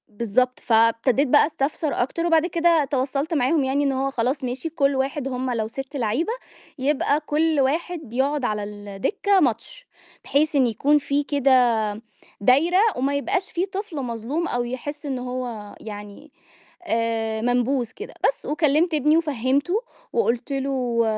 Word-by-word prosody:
بالضبط. 235 +4 0
فابتديت 230 +4 +3
بقى 290 +3 +5
أستفسر 300 0 -2
أكتر 335 +7 -1
وبعد 325 -1 +4
كده 335 -3 +3
توصَّلت 275 +3 -1
معاهم 285 +1 +2
يعني 270 +2 +1
إن 275 - +2
هو 270 +1 -1
خلاص 260 +3 -1
ماشي 255 +6 -3
كلّ 285 -3 +1
واحد 270 +1 -1
هُم 255 -1 -2
لو 225 -3 -1
6 270 +5 -7
لعيبة، 265 - 0 0.5
يبقى 285 +1 +1
كلّ 310 +1 0
واحد 310 -1 -2
يقعد 275 +2 0
على 210 -2 -1
الدكّة 205 - -1
ماتش، 295 - -2 0.4
بحيث 295 +2 +1
إن 265 -3 +4
يكون 275 +7 +2
في 285 0 0
كده 280 -1 +1 0.9
دايرة 285 - +4 0.2
وما 275 +3 0
يبقاش 370 +6 -1
في 350 +2 0
طفل 390 -3 -6
مظلوم 250 +8 -3
أو 245 0 -1
يحس 285 +5 -6
إن 265 -3 -2
هو 250 -4 -5
يعني، 210 +7 -9 0.6
آآ 225 -1 -1
منبوذ 245 +1 +1
كده، 425 - -8
بس، - - -2
وكلِّمت 310 +2 +2
ابني 300 +1 +3
وفهِّمته 285 +1 0 0.4
وقُلت 245 - 0
له: 260 -4 0
275 Hz, 145 wpm, -23 LUFS, 245-305 Hz, 0.9 s, بقى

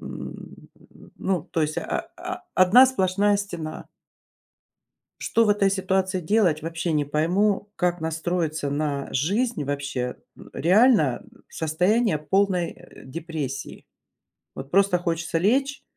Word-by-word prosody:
м, - - -9 0.5
ну, 185 -4 -1
то 165 -3 -2
есть 155 0 -1
о 340 -1 -4
о 360 +1 -6
одна 200 +8 +7
сплошная 205 -4 +2
стена. 175 -6 -5 1.4
Что 230 - +2
в - - +1
этой 205 -1 +3
ситуации 190 -1 0
делать, 180 -3 +2
вообще 165 0 -2
не 150 -1 +1
пойму, 190 +7 0
как 175 -2 0
настроиться 160 -2 -2
на 145 -1 -2
жизнь, 200 - 0
вообще? 140 -3 -3 0.4
Реально 190 - +3 0.2
состояние 180 +5 +1
полной, 180 +2 +1
э, - - -16
депрессии. 145 -1 -6 0.7
Вот 135 +1 -8
просто 195 -1 +4
хочется 170 -1 -2
лечь, 270 +10 +1
180 Hz, 115 wpm, -24 LUFS, 155-205 Hz, 1.4 s, одна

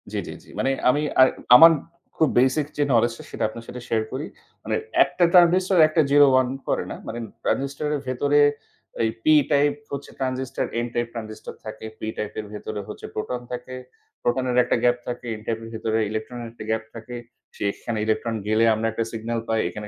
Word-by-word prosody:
জ্বি, - - -2
জ্বি, - - -6
জ্বি। - - -17
মানে 135 - +2 0.2
আমি 145 +4 +2 0.2
আর 130 - +9 0.3
আমার 165 +6 +10 0.5
খুব 160 - +4
বেসিক 130 +4 +3
যে 145 - +3
knowledge 120 -1 +3
টা - - -9
সেটা - - -3
আপনার 115 +1 -10
সাথে 125 - -8
শেয়ার 110 -1 +1
করি। 135 +4 -4 0.4
মানে - - -1 0.3
একটা 180 - -1
transistor 185 +1 +5
একটা 155 +1 +2
0 - - -5 0.3
ওন 130 - +1 0.2
করে - - 0
না। - - -4
মানে 115 - -5 0.2
transistor 140 +2 -1
এর - - -2
ভেতরে 140 +3 +2 0.6
এই 110 - +2
পি 155 - +6 0.2
টাইপ 145 0 +4 0.2
হচ্ছে 140 0 -6
ট্রানজিস্টর, 130 -1 -2
এন 120 - -1
টাইপ 120 0 -1
ট্রানজিস্টর 110 -2 -7
থাকে। 110 0 -7
পি 110 - -5
টাইপের 105 0 -4
ভেতরে 105 0 -5
হচ্ছে 105 - -8
প্রোটন 125 +3 -3
থাকে। 125 +1 -6 0.5
প্রোটন 125 +2 0
এর 125 - 0
একটা - - +1
গ্যাপ 120 0 +4
থাকে। 125 0 -5
এন 110 - -10
টাইপ 115 -1 -2
এর 115 - -8
ভেতরে 110 0 -1
ইলেকট্রন 110 +3 -5
এর 115 - -7
একটা 115 - -10
গ্যাপ 110 0 0
থাকে। 115 +2 -8 0.4
সেখানে 105 +2 -3
ইলেকট্রন 110 +1 -1
গেলে 110 +1 +3
আমরা 110 +1 -1
একটা 115 +1 -1
সিগনাল 115 +1 -3
পাই। 110 0 +1
এখানে 105 0 -7
120 Hz, 200 wpm, -24 LUFS, 110-135 Hz, 0.6 s, আমার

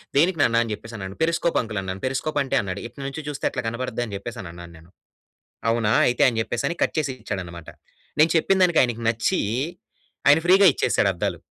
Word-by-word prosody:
"దేనికి 170 +5 +3
నాన్న 115 0 +4
అని 115 - -6
జెప్పేసి" 115 +3 -9
అన్నాను. 95 -1 -7
పెరిస్కోప్ 165 +1 +1
అంకుల్ 110 -4 -4
అన్నాను. 95 0 -6
'పెరిస్కోప్' 135 +3 -1
అంటే 135 - -2
అన్నాడు. 95 0 -5
ఇటు 120 +4 -12
నుంచి 145 +3 -6
జూస్తే 145 -2 -4
అట్లా - - -3
కనబడద్దని 120 -2 -3
జెప్పేసన్నాను 90 -6 -8
నేను. 80 +2 -18 0.8
'అవునా?' 115 -2 +1
అయితే 125 - +2
అని 115 - 0
జెప్పేసని 140 +9 -2
కట్ - - -1
జేసిచ్చాడనమాట. 100 - -5 0.5
నేను 155 +1 +5
చెప్పిన 190 +4 +2
దానికి 175 -3 +4
ఆయనికి 120 -2 -2
నచ్చీ 115 +11 0 0.9
ఆయన 145 +3 +7
ఫ్రీగా 190 +2 +6
ఇచ్చేసాడు 100 - +1
అద్దాలు. 85 - -2
120 Hz, 170 wpm, -23 LUFS, 100-145 Hz, 0.9 s, ఆయన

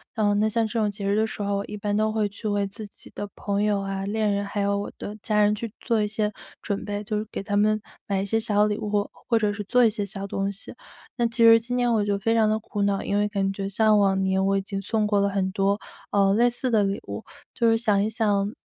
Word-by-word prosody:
呃， 210 -3 +2
那 210 +1 +2
像 225 0 +1
这 230 - -4
种 210 -1 +1
节 200 -1 -5
日 200 - +2
的 220 +1 +2
时 220 - -6
候， 200 0 0
我 200 - -3
一 210 - -6
般 205 0 -1
都 215 0 +2
会 215 -1 +1
去 215 +2 -6
为 205 -1 0
自 215 +2 -8
己 205 - -13
的 205 - -4
朋 200 0 -1
友 210 -1 +2
啊， 195 0 -3
恋 215 +1 0
人、 200 0 -1
还 200 +1 -3
有 200 0 +1
我 200 - -4
的 210 +1 -6
家 210 -1 +2
人 210 0 +4
去 225 +1 -5
做 230 -3 +1
一 - - 0
些 210 0 -1 0.3
准 200 -2 -3
备， 205 0 -3
就 210 0 -2
是 210 - -2
给 - - -4
他 200 +1 -3
们 215 +1 +2 0.3
买 195 -1 0
一 - - -2
些 225 +3 +1
小 210 -2 +2
礼 210 0 -1
物， 210 - -4
或 205 -1 0
或 230 -2 0
者 210 -2 +1
是 205 0 -5
做 245 +5 +3
一 - - +5
些 210 -1 -3
小 200 0 -6
东 195 0 -2
西。 200 - -9 0.4
那 240 -2 +1
其 230 0 +1
实 230 0 +8
今 240 +2 -4
年 245 -1 +2
我 220 -2 +2
就 200 -1 0
非 225 +3 +1
常 220 -1 +4
地 215 0 +1
苦 215 -1 -5
恼， 200 -1 +1
因 200 - -1
为 205 0 +2
感 195 -2 0
觉 195 0 -4
像 215 +1 +4
往 195 -1 +3
年 190 0 +1
我 195 0 +2
已 - - 0
经 195 0 -5
送 215 +1 0
过 200 -1 +2
很 195 -1 0
多， 200 +1 +1 0.3
呃， 195 -1 +3
类 240 +3 +4
似 245 +2 -3
的 220 -3 +3
礼 195 0 -1
物 - - -4
了， - - -15 0.3
就 235 -1 +3
是 225 - +3
想 210 -4 +2
一 215 - 0
想， 210 -2 0
205 Hz, 310 characters per minute, -25 LUFS, 200-220 Hz, 0.4 s, 实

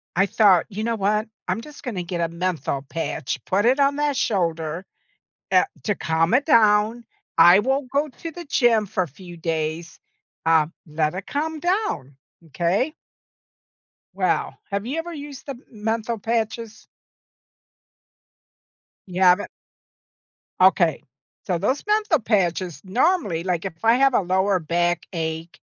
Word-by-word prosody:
I 195 - +4
thought, 195 -5 +4
"You 215 +1 -5
know 230 0 0
what? 210 +1 0 0.2
I'm 185 +4 -1
just 300 +3 -13
gonna 200 -9 -3
get 170 0 -4
a 165 - 0
menthol 170 -6 -2
patch, 140 -4 -4
put 200 +4 +1
it 260 +4 +3
on 280 0 +3
that 295 -1 0
shoulder, 170 -5 -1 0.7
eh - - +5 0.2
to 205 - 0
calm 165 +3 0
it 270 +3 +3
down. 220 -2 +4 0.3
I 175 +4 +8
won't 265 +3 0
go 285 +2 +1
to 325 +4 -8
the 345 +2 -9
gym 235 -6 +3
for 185 -1 -1
a - - -7
few 175 +5 -12
days. 160 0 -3 0.5
Um. 160 0 +3
Let 155 +1 -1
it 190 - -6
calm 310 +2 -2
down. 350 - -1 0.3
M'kay?" 175 - -1 1.2
Well, - - 0 0.2
have 200 +2 -2
you 280 +6 -3
ever 340 +1 -4
used 285 -3 -9
the 280 - -3
m 255 -1 -14
menthol 225 +1 -2
patches? 225 0 -3 2.2
You 185 0 -3
haven't? 180 +2 +5 1.1
Okay, 180 -4 +4 0.4
so 180 -2 0
those 255 - -1
menthol 420 -6 +2
patches, 185 - 0
normally, 205 - +1
like, 180 -2 -1
if 175 -4 -7
I 230 - +6
have 270 +1 +3
a - - +4
lower 190 +1 +1
backache, 170 -1 -2
195 Hz, 145 wpm, -23 LUFS, 170-245 Hz, 2.2 s, I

